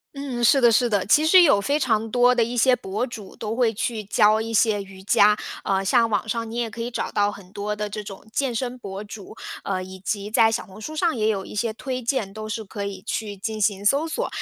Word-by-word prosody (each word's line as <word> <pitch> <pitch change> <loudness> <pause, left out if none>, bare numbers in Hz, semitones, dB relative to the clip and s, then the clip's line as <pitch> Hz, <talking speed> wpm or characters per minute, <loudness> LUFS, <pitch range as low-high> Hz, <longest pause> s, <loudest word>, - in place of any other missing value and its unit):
嗯， 265 -4 -4
是 275 +4 +5
的 240 -2 +5
是 240 +1 +3
的， 205 -3 +1
其 300 +8 +4
实 365 +2 +8
有 205 -11 +4
非 285 +7 +1
常 225 -5 0
多 245 +1 +4
的 240 -2 +3
一 240 +2 -4
些 255 +2 +5
博 215 0 -3
主 220 -6 -10
都 220 +1 -4
会 240 -3 +2
去 220 0 -3
教 210 +2 +3
一 225 +1 -4
些 215 -2 +2
瑜 190 -1 -12
伽。 210 +1 +4 0.3
呃， 195 0 0
像 230 +1 +3
网 215 - -1
上 230 0 -2
你 230 - -7
也 240 -1 -1
可 230 +1 -7
以 235 - -3
找 235 - -3
到 205 0 +1
很 190 -3 -13
多 210 0 -3
的 210 0 -3
这 210 +1 -6
种 195 -1 -10
健 260 -3 -1
身 250 +1 -2
博 195 -2 -7
主， 205 -1 -10 0.3
呃， 185 -2 -2
以 190 0 -10
及 205 +2 -3
在 225 0 +4
小 225 - -2
红 200 +2 -13
书 310 +7 -6
上 330 -1 +1
也 215 -2 0
有 200 -3 -1
一 - - -10
些 220 +2 -1
推 255 +1 -4
荐， 230 -5 -2
都 215 0 -7
是 220 +1 -3
可 200 0 -6
以 195 -1 -6
去 205 -2 -4
进 215 +2 -4
行 200 0 0
搜 285 +8 +3
索。 475 +10 -2
220 Hz, 275 characters per minute, -23 LUFS, 205-245 Hz, 0.3 s, 实